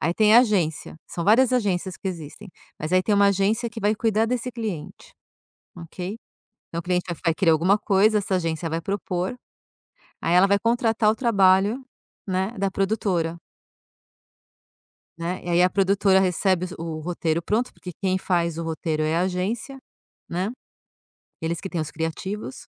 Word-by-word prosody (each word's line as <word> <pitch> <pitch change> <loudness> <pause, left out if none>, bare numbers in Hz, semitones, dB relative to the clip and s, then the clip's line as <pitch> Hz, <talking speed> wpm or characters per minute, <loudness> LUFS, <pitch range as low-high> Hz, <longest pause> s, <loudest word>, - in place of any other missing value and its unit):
aí, 165 - +1
tem 215 +1 +5
a 240 - +10
agência, 180 - 0
são 170 - -5
várias 245 +4 +5
agências 190 -6 0
que 195 - -4
existem, 175 +3 -8 0.3
mas, 155 +3 -4
aí, 185 - +4
tem 210 - +1
uma 200 0 +5
agência 205 +5 +1
que 225 0 -8
vai 210 +1 +2
cuidar 220 0 +1
desse 250 +1 -2
cliente, 220 -10 -6 0.6
ok? 180 +3 -6 0.5
Então 170 - -4
o - - -7
cliente 180 0 0
vai 175 - -3
vai 165 - +3
querer 170 -4 +3
alguma 175 +6 +3
coisa, 210 +1 +3
essa 190 -1 -1
agência 165 -1 -2
vai 165 +1 -2
propor, 190 +1 -3 0.9
aí, 165 - +1
ela 185 +2 +6
vai 200 - +4
contratar 230 -2 +2
o - - -2
trabalho, 205 0 +3 0.5
né, 190 +2 -1
da 195 0 0
produtora 190 -4 0 1.8
né, 170 +2 -3
e, 175 - -6
aí, 175 +1 +4
a 180 - +4
produtora 195 0 +3
recebe 185 0 +1
o 165 -1 -4
roteiro 170 0 -1
pronto, 230 +7 -1
porque 180 - -9
quem 190 0 -1
faz 170 -3 0
o 165 - -2
roteiro 160 -1 -2
é 155 +2 +1
a - - +2
agência, 200 +9 -2 0.5
né, 185 +4 -2 0.9
eles 165 +1 -2
que 195 - -5
têm 170 -3 -2
os 155 - -5
criativos. 190 +9 -5
190 Hz, 170 wpm, -24 LUFS, 170-210 Hz, 1.8 s, a